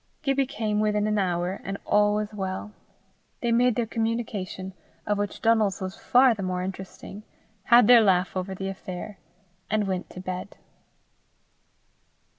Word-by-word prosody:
Gibbie 275 -2 +1
came 215 -5 -2
within 210 -1 +1
an 215 -1 +1
hour, 180 0 -1
and 195 +1 -4
all 205 0 +3
was 210 0 -3
well. 190 +1 -4 0.7
They 235 - 0
made 245 0 +3
their 240 - 0
communication, 220 -5 -3 0.3
of 210 -1 0
which 205 -1 -4
Donal's 220 -4 +3
was 190 0 -5
far 250 0 +4
the 210 - -6
more 180 -1 -2
interesting, 190 +2 -7 0.4
had 240 -1 +7
their 240 +1 +8
laugh 190 -3 +2
over 190 +1 -3
the 195 +1 -4
affair, 190 +1 -7 0.5
and 215 -1 +1
went 185 -1 -3
to - - -10
bed. 185 +1 -6
205 Hz, 150 wpm, -26 LUFS, 190-225 Hz, 0.7 s, their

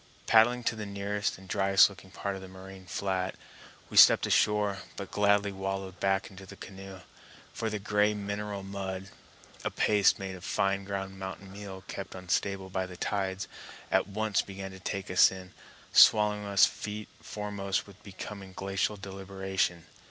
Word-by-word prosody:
Paddling 120 +2 +5
to 115 - 0
the 105 -1 -5
nearest 100 +1 -2
and 95 0 -14
driest 95 0 +5
looking 95 -1 -13
part 100 +1 -4
of 95 - -8
the 95 - -9
moraine 95 0 -12
flat, 95 0 -2 0.6
we - - -7
stepped - - +9
ashore, 105 -2 +2 0.2
but 100 - -7
gladly 100 0 +3
wallowed 95 -1 -4
back 95 0 0
into 95 0 -11
the - - -10
canoe; 95 -1 -10 0.5
for 110 - -2
the 105 - -2
gray 105 +1 +2
mineral 100 0 -4
mud, 95 -1 -5 0.5
a - - 0
paste 105 -2 +3
made 95 -1 -5
of 90 - -12
fine 100 0 0
ground 95 -1 -5
mountain 95 0 -7
meal 95 -1 -8
kept 100 - -6
unstable 95 +1 -2
by 95 0 -1
the 90 -1 -10
tides, 95 -1 -2 0.4
at - - +3
once 105 +1 0
began 95 0 -7
to 95 - -11
take 95 0 -4
us 90 - +7
in, 95 -1 -10 0.4
swallowing 105 -1 +6
us 100 -1 +6
feet 105 0 -5
foremost 100 -2 -3
with 100 0 -16
becoming 100 -1 -8
glacial 95 +2 -1
deliberation. 95 -3 -3
95 Hz, 165 wpm, -30 LUFS, 95-100 Hz, 0.6 s, stepped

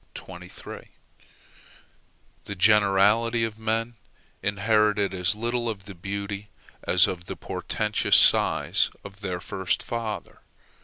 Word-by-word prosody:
The 100 - -5
generality 105 +3 +4
of 110 -1 -3
men 115 +1 -2 0.4
inherited 105 0 +2
as 90 +1 0
little 120 +2 -2
of 100 -3 -6
the 100 - -9
beauty 100 +3 -5 0.3
as 90 - +5
of 90 -1 -4
the - - -6
portentous 105 0 0
size - - +4
of 100 0 -11
their 90 -3 -3
first 95 -1 -2
father. 115 -2 -5
105 Hz, 105 wpm, -26 LUFS, 100-110 Hz, 0.4 s, as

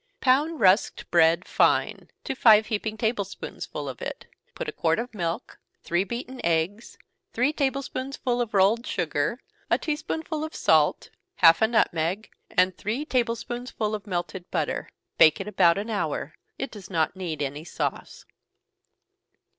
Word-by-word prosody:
_ - - -52
Pound 290 +5 +2
rusked 195 +1 +2
bread 170 +1 +4
fine - - +1
to - - -3
five 220 -4 +6
heaping 220 0 -3
table 220 -1 0
spoonsful 150 -6 -7
of 130 -4 -7
it, - - -6 0.3
put - - -5
a - - -2
quart 165 -1 +1
of 235 +1 -4
milk, 170 -4 -4 0.2
three 175 +2 +1
beaten 245 +5 -6
eggs, 170 +6 -1 0.4
three 255 +6 +1
table 275 -2 0
spoonsful 255 -2 -3
of 225 -3 -3
rolled 205 +5 +3
sugar, 170 - -1 0.3
a - - +4
tea 305 -2 -2
spoonful 315 0 -4
of 315 - -6
salt, 155 -2 +2 0.2
half 165 +2 +6
a 220 - +5
nutmeg, 190 -3 0 0.2
and 185 -1 +2
three 230 +9 -2
table 240 -5 +1
spoonsful 240 -3 -4
of 210 -1 -5
melted 180 0 -4
butter. - - -2 0.3
Bake 155 -1 +7
it 195 - -5
about 170 -4 +4
an 210 +3 -3
hour 205 - -2 0.2
it 270 - -4
does 200 -4 -11
not 165 -2 0
need 175 -5 -4
any 145 +2 -4
sauce. 165 - -4
210 Hz, 160 wpm, -26 LUFS, 175-245 Hz, 0.4 s, Bake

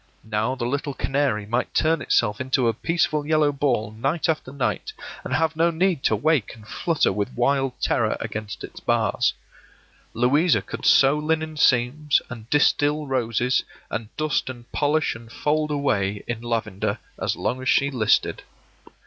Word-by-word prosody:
Now 110 +4 -1
the 120 -2 -3
little 140 +2 -2
canary 135 -7 0
might 120 +4 -2
turn 160 +1 +2
itself 110 0 +1
into 130 -1 +1
a 115 - +2
peaceful 155 +4 0
yellow 155 -1 +2
ball 130 -7 0
night 135 +11 -1
after 155 -5 -1
night, 140 - -2 0.3
and - - -6
have 160 -1 +1
no 165 +2 +3
need 170 -2 +1
to 110 - +3
wake 135 0 +1
and 110 -1 -16
flutter 160 - 0
with 105 +4 -2
wild 135 +1 +1
terror - - +1
against 105 -2 -6
its - - -9
bars. - - +1 0.8
Louisa 145 +8 +3
could - - -4
sew 140 +2 +5
linen 155 0 -1
seams, 140 +2 +3
and 115 -1 -9
distil 150 +1 +2
roses, 125 -2 0 0.3
and 110 -1 -4
dust 155 -3 0
and 120 -2 -10
polish 150 +1 +1
and 115 0 -12
fold 150 +4 0
away 105 -9 0
in 120 -1 -4
lavender, 115 -4 -2 0.2
as - - -1
long 130 +1 -2
as 130 - -1
she 140 +1 +3
listed. 110 -5 +1
135 Hz, 160 wpm, -23 LUFS, 115-150 Hz, 0.8 s, sew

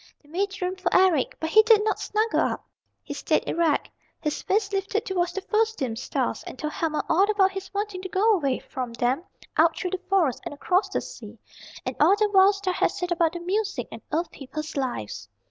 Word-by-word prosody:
They 290 - -22
made 385 +4 -2
room 365 +1 -1
for 365 -2 -1
Eric. 365 -8 +3
But 320 0 -3
he 435 - +8
did 435 -1 +5
not 430 - 0
snuggle 435 +1 0
up. - - -1 0.4
He - - -6
stayed - - 0
erect, 330 -3 +1 0.3
his 300 -2 -2
face 400 0 0
lifted 400 +3 -1
towards 355 -4 -1
the 390 - -3
first 445 +2 +1
dim 245 -5 -2
stars, 245 - -2
and - - -8
told 305 -1 -4
Helma 315 -2 -1
all 385 +5 +3
about 395 -2 +4
his 385 0 -7
wanting 405 -2 -3
to 375 - -6
go 415 +5 +3
away 280 -9 +1
from 250 -3 -6
them 245 +7 0 0.3
out 325 +1 +4
through 365 - -3
the 375 -1 -3
Forest 350 -10 +2
and - - -6
across 365 +6 +1
the - - -1
sea, - - -10 0.5
and - - -3
all 395 - +6
that 420 0 +1
Wild 390 +1 +6
Star 390 -2 -2
had - - +2
said 360 0 -4
about 340 0 +1
music 415 +3 -1
and - - -8
Earth 330 +1 -1
People's 305 +3 -7
lives. 240 - -4
370 Hz, 215 wpm, -25 LUFS, 315-400 Hz, 0.5 s, he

